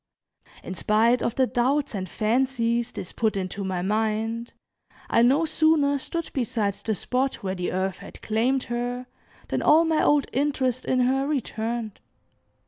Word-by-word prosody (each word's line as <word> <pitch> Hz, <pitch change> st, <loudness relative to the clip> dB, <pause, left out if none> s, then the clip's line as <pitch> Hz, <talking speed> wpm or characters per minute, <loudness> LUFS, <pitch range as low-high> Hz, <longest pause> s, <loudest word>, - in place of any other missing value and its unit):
In -, -, -5 dB
spite 220 Hz, +6 st, +2 dB
of 235 Hz, -, -1 dB
the 260 Hz, -, +3 dB
doubts 265 Hz, +4 st, 0 dB
and 185 Hz, -3 st, -4 dB
fancies 235 Hz, +1 st, 0 dB
this 180 Hz, -, -6 dB
put 220 Hz, -3 st, 0 dB
into 190 Hz, +1 st, -3 dB
my 185 Hz, -2 st, -2 dB
mind, 220 Hz, +3 st, -1 dB, 0.6 s
I 230 Hz, -, +4 dB
no 275 Hz, +7 st, +4 dB
sooner 305 Hz, -3 st, +2 dB
stood 335 Hz, +4 st, -4 dB
beside 230 Hz, -6 st, 0 dB
the 220 Hz, +2 st, -3 dB
spot 255 Hz, +6 st, -2 dB
where 190 Hz, -1 st, -1 dB
the 180 Hz, -1 st, -3 dB
earth 190 Hz, 0 st, -2 dB
had -, -, -11 dB
claimed 245 Hz, +5 st, +1 dB
her, 245 Hz, +1 st, -3 dB, 0.4 s
than -, -, -1 dB
all 320 Hz, +2 st, +5 dB
my 320 Hz, -1 st, +2 dB
old 290 Hz, -2 st, +4 dB
interest 260 Hz, -2 st, 0 dB
in 255 Hz, -1 st, +2 dB
her 270 Hz, +2 st, +1 dB
returned. 230 Hz, -6 st, -3 dB
240 Hz, 155 wpm, -25 LUFS, 215-270 Hz, 0.6 s, all